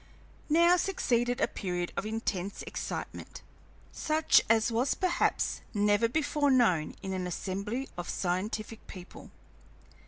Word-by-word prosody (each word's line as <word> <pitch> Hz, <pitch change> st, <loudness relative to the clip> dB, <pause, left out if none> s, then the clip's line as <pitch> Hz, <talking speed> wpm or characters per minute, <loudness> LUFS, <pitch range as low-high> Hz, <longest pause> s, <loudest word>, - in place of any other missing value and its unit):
Now 340 Hz, +3 st, +5 dB
succeeded 245 Hz, -10 st, 0 dB
a -, -, +3 dB
period 180 Hz, -3 st, -3 dB
of 215 Hz, -, -2 dB
intense 205 Hz, -3 st, -3 dB
excitement, -, -, -6 dB, 0.5 s
such 310 Hz, 0 st, +3 dB
as 225 Hz, +1 st, +3 dB
was 245 Hz, +4 st, +1 dB
perhaps 360 Hz, -2 st, 0 dB
never 205 Hz, +2 st, +3 dB
before 290 Hz, +1 st, +1 dB
known 215 Hz, -, +3 dB
in 190 Hz, -, -3 dB
an 185 Hz, -1 st, -2 dB
assembly 200 Hz, +8 st, -3 dB
of 175 Hz, -, -5 dB
scientific 210 Hz, +5 st, -3 dB
people. 180 Hz, -2 st, -11 dB
225 Hz, 120 wpm, -30 LUFS, 190-270 Hz, 0.5 s, Now